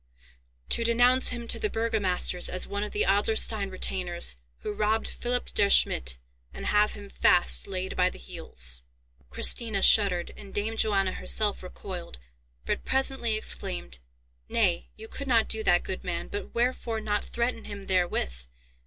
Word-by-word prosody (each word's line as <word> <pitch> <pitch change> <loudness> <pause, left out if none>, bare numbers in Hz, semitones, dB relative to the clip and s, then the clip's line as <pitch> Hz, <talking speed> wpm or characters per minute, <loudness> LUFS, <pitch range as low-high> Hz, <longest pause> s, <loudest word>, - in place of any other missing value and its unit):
"To - - +3
denounce 245 +3 +4
him 235 -2 -4
to - - +3
the 425 - -1
burgomasters 205 - +1
as 185 - -2
one 200 0 -4
of 210 - -4
the 210 - 0
Adlerstein 205 +1 +2
retainers 180 - -1 0.2
who 210 - -4
robbed 215 +1 0
Philipp 245 0 -3
der 200 -1 +4
Schmidt, 65 - +3 0.4
and - - -7
have 210 0 +2
him 205 -1 -10
fast 180 -2 +3
laid 190 -1 -4
by 180 0 +2
the - - -12
heels." - - -2 0.5
Christina 200 - +3
shuddered, 190 -5 +4
and 195 - -13
Dame 215 +2 -1
Johanna 195 -4 +1
herself 210 +1 +1
recoiled; 180 - -8 0.5
but - - -2
presently 265 -4 0
exclaimed, 185 - -2 0.5
"Nay, - - +1
you - - -11
could 280 +4 -7
not 230 -4 +3
do 220 - 0
that, 175 -4 +3
good 185 - -6
man, 175 -2 -4
but 205 - -6
wherefore 235 -1 -1
not 210 -1 -2
threaten 235 -1 -3
him 200 -1 -8
therewith? 120 - -1
205 Hz, 155 wpm, -27 LUFS, 180-225 Hz, 0.5 s, denounce